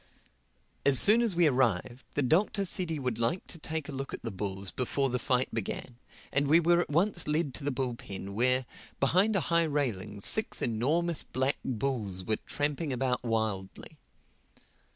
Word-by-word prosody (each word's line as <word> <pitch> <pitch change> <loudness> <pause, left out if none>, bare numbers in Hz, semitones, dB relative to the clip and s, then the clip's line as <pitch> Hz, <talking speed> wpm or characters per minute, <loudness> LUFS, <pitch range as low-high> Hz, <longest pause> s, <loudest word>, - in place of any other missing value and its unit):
As 140 -2 +9
soon 220 +3 +8
as 225 -6 +1
we 175 0 +3
arrived 125 - 0
the 145 - +1
Doctor 195 +8 +1
said 180 -1 -1
he 160 - -2
would 125 -5 -3
like 120 +11 -1
to 165 - -7
take 160 -1 -5
a - - -6
look 135 0 -5
at - - -14
the 115 - -4
bulls 95 0 -5
before 135 +1 -1
the 125 - -1
fight 125 +1 -1
began; 115 +2 -5 0.4
and 140 +1 +2
we 160 +4 +5
were 170 +1 +3
at - - -5
once 175 +3 0
led 150 -2 0
to 145 - -8
the 145 - -1
bull 130 -2 -2
pen 100 -3 -8
where, 125 +4 +1 0.3
behind 185 +10 +2
a - - +3
high 170 - +4
railing, 115 -10 -3
six 220 - +4
enormous 150 +9 0
black 130 +2 -2
bulls 110 -7 -3
were 110 +2 -1
tramping 145 +1 -2
around 130 0 -1
wildly. 110 -5 -4
135 Hz, 180 wpm, -29 LUFS, 115-160 Hz, 0.4 s, As